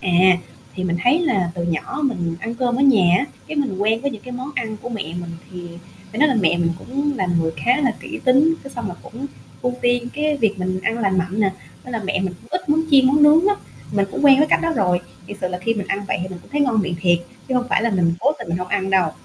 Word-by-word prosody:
À, 180 0 +4 0.4
thì 185 - -3
mình 175 -1 0
thấy 255 +7 +4
là 195 - +1
từ 175 - -3
nhỏ 170 - -2
mình 175 -11 -1
ăn 230 +2 -4
cơm 240 0 0
ở 270 - +1
nhà 200 -11 +5
á, - - 0 0.2
cái 310 - -6
mình 265 -10 -1
quen 220 +3 +1
với 280 +2 -1
những 220 -5 -9
cái 250 - -9
món 255 +3 -5
ăn 220 -3 -3
của - - -5
mẹ 225 -4 -3
mình 170 +1 -6 0.2
thì 175 -1 -7 0.4
phải 220 - -5
nói 305 - +5
là 265 - +2
mẹ 175 -1 +2
mình 170 -1 +1
cũng 280 +5 -2
là 190 - 0
người 160 0 -1
khá 240 - +2
là 265 -4 +2
kỹ 325 +1 -7
tính, 280 +5 +5
cái 275 - -8
xong 240 -5 -5
là 180 - -6
cũng 255 +5 -7 0.4
ưu 250 0 0
tiên 245 0 +1
cái 300 0 0
việc 220 -7 +1
mình 185 0 -2
ăn 225 +4 0
lành 195 -4 +1
mạnh 185 +4 -1
nè, 200 -2 +3 0.3
nên 250 - -8
là 230 - -2
mẹ 195 0 0
mình 185 -1 -2
cũng - - -18
ít 365 - -19
món 300 +2 +3
chiên 270 -2 +6
món 290 +3 +4
nướng 305 +4 +7
lắm, 405 +1 +3 0.4
mình 200 -1 +1
cũng - - -3
quen 270 -1 +8
với 300 - +4
cách - - +4
đó 330 - +1
rồi. 180 -4 +2 0.3
Thiệt 205 +2 -8
sự 185 - -1
là 180 0 -4
khi 230 +5 0
mình 200 -3 -4
ăn 200 +1 -2
vậy - - 0
thì 185 - -4
mình 185 -2 -8
cũng - - -20
thấy 290 - -1
ngon 250 -6 +3
miệng 180 -3 -2
thiệt 175 -1 +3 0.3
chứ 260 - -1
hông 245 -1 +1
phải - - +2
là 235 - +1
mình 175 -4 +2
cố 280 +5 +3
tình - - -8
mình 170 +1 -1
hông 180 0 -5
ăn 195 -1 -1
đâu, 185 -4 +3
220 Hz, 290 wpm, -21 LUFS, 185-265 Hz, 0.4 s, quen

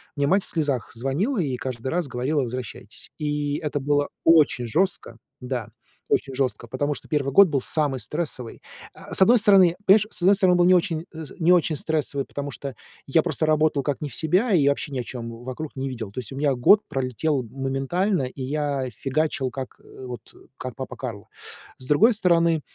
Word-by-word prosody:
мне 145 -1 0
мать 190 +4 +3
в - - -1
слезах 145 -6 -1
звонила 150 - -1
и 135 -6 -1
каждый 130 0 -5
раз 170 -3 -1
говорила: 135 +4 -1
"Возвращайтесь!" 125 -1 -7
И 145 -1 -1
это 145 -1 -3
было 145 +1 +1
очень 155 -7 +4
жестко. 165 -5 -1 0.2
Да, 125 -3 -4 0.4
очень 135 -2 0
жестко, 130 -3 -2
потому 145 +5 -1
что - - -9
1 140 -3 -1
год 200 -1 +8
был 140 -4 -1
самый 145 -4 0
стрессовый. 145 -7 -5 0.3
Э, - - -14
с - - +1
одной 240 +3 +5
стороны, 195 -5 +5
понимаешь, 205 +2 +6
с - - -9
одной 195 +3 +5
стороны, 185 -3 +3
он - - +3
был 175 - +5
не 185 0 +6
очень 170 -2 0
э, 160 0 -7 0.2
не 170 +2 +4
очень 170 -3 +3
стрессовый, 145 -2 -2
потому 145 0 -5
что 140 -2 -7 0.3
я 155 +3 +3
просто 155 - -1
работал 155 -2 +2
как 145 -1 -2
не 145 - -3
в - - -12
себя, 185 +8 +1
и 145 -5 +4
вообще 140 +1 -2
ни 130 - -3
о - - -2
чем 115 -1 -7
вокруг 140 +4 -6
не 135 0 -3
видел. 115 -6 -6
То 130 - -6
есть 120 - -8
у - - -7
меня 145 -1 +2
год 200 +12 +5
пролетел 135 +2 -1
моментально, 135 - -1
и 130 +1 -6
я 140 -1 -2
фигачил, 135 +2 -1
как 130 +1 -7
вот, 125 -2 -9 0.4
как 130 -3 -6
папа 130 - -6
Карло. 115 -6 -7 0.5
С 130 - -11
другой 220 +11 +5
стороны, 170 -5 +2
145 Hz, 200 wpm, -24 LUFS, 130-165 Hz, 0.5 s, год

